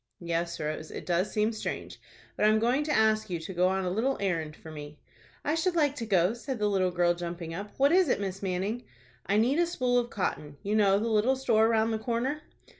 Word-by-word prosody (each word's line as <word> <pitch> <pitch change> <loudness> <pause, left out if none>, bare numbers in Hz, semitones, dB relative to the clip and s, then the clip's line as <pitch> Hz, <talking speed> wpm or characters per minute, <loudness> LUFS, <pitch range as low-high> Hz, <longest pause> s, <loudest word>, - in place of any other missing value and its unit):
"Yes, 170 0 -2
Rose, 155 +1 -4
it - - -7
does 180 +3 0
seem 215 0 +1
strange. 215 - -5 0.3
But - - +1
I - - +6
am 215 - +4
going 245 +6 +2
to 300 - -1
ask 220 -3 +2
you 175 -2 -2
to 175 +4 -6
go 180 +1 +3
on 190 0 0
a - - 0
little 245 +8 0
errand 165 -6 -2
for 160 - -12
me." 150 -1 -9 0.5
"I 295 - +1
should 340 +2 0
like 290 -4 +2
to 230 - -4
go," 185 -1 +3
said 255 +2 -5
the 210 - 0
little 190 -2 +2
girl, 175 -1 +2
jumping 170 -1 -6
up. 200 +4 -5
"What 280 +2 +4
is 365 -3 +4
it, - - +2
Miss 195 -1 -4
Manning?" 195 +5 -2 0.4
"I 205 - +2
need 250 +8 +3
a 345 - +3
spool 250 -7 +1
of 240 0 -3
cotton. 150 -8 -3
You 205 +2 0
know 200 -2 +4
the 220 +3 -1
little 225 +4 +3
store 225 -4 +3
round 225 0 +2
the 220 - -1
corner." 245 +6 -2
210 Hz, 240 wpm, -29 LUFS, 180-240 Hz, 0.5 s, I